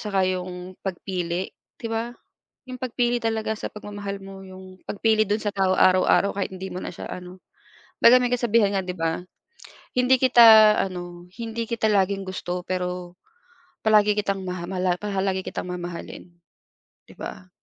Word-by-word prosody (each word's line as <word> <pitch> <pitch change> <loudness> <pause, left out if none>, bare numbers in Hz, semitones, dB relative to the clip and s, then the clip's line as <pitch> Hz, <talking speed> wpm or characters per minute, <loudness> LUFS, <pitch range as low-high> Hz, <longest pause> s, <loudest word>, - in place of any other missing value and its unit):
saka 195 -3 0
'yung 185 0 -4
pagpili, 180 -1 -3 0.2
di 230 - -6
ba, 230 +2 -2 0.6
'yung 255 - -6
pagpili 245 -1 0
talaga 220 -1 -1
sa - - -5
pagmamahal 205 -1 -6
mo, 195 0 -10
'yung 185 0 -12
pagpili 215 +1 +2
do'n 210 +1 0
sa 205 -1 -2
tao 190 -1 +2
araw-araw 185 +2 +4
kahit 200 - -2
hindi 190 0 -6
mo 185 - -5
na - - -5
siya - - -8
ano 180 +1 -9 0.6
kumbaga 250 +2 +7
may 245 - +1
kasabihan 230 -4 +2
nga, 190 - +1
'di 180 - -3
ba, 165 +1 -2 0.7
"Hindi 250 0 +4
kita 225 -4 +8
ano, 175 -2 -7 0.2
hindi 230 0 -3
kita 225 -1 -1
laging 195 -1 +1
gusto, 180 -1 -4
pero 180 -1 -4 0.7
palagi 210 -1 +4
kitang 195 -2 -1
maha 180 -1 -4
mala 185 -1 0
paha 200 0 -3
lagi 190 -1 -1
kitang - - -5
mamahalin," 175 -1 -6 0.9
'di - - -13
ba? 185 0 -8
195 Hz, 160 wpm, -24 LUFS, 180-220 Hz, 0.9 s, kita